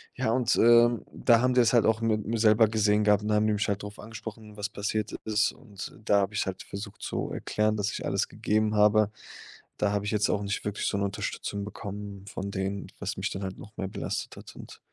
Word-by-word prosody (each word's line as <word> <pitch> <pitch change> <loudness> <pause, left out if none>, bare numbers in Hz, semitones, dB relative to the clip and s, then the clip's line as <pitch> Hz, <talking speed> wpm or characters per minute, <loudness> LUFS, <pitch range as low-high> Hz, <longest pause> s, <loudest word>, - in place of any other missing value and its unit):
Ja - - 0
und, 125 0 +2
ähm, 120 0 +5
da 120 -1 +4
haben 125 0 +3
die 125 - +6
das 115 +1 +3
halt 120 - +5
auch 110 0 +2
m 115 - +1
mit 105 -1 +1
mir 115 0 0
selber 110 0 +5
gesehen 105 -1 +2
gehabt 105 0 +4
und 105 - -1
haben 105 0 +3
mich 105 -1 +1
halt 100 0 -1
drauf 105 0 -8
angesprochen, 110 -1 -9
was 105 0 -3
passiert 105 +1 -2
ist 110 -1 +2
und 100 -6 -10
da 100 -1 +4
habe 100 +2 -2
ich's - - +1
halt 95 -1 -4
versucht 100 +1 -8
zu - - -3
erklären, 110 0 0
dass 105 0 0
ich - - -5
alles - - 0
gegeben 110 0 0
habe. 105 0 +5 0.7
Da 105 -1 +1
habe 105 0 -1
ich 105 - -1
jetzt 105 -1 +2
auch 105 - +1
nicht 100 0 -2
wirklich 105 0 -2
so 100 - 0
'ne 100 - 0
Unterstützung 100 +1 -4
bekommen 100 -1 -7
von 100 0 -5
denen, 95 +1 -3
was - - -4
mich - - -1
dann 95 - -5
halt 95 -1 -5
noch 105 +1 -12
mehr 95 -1 -3
belastet - - -4
hat. - - -12
Und - - -11
105 Hz, 235 wpm, -28 LUFS, 100-110 Hz, 0.7 s, die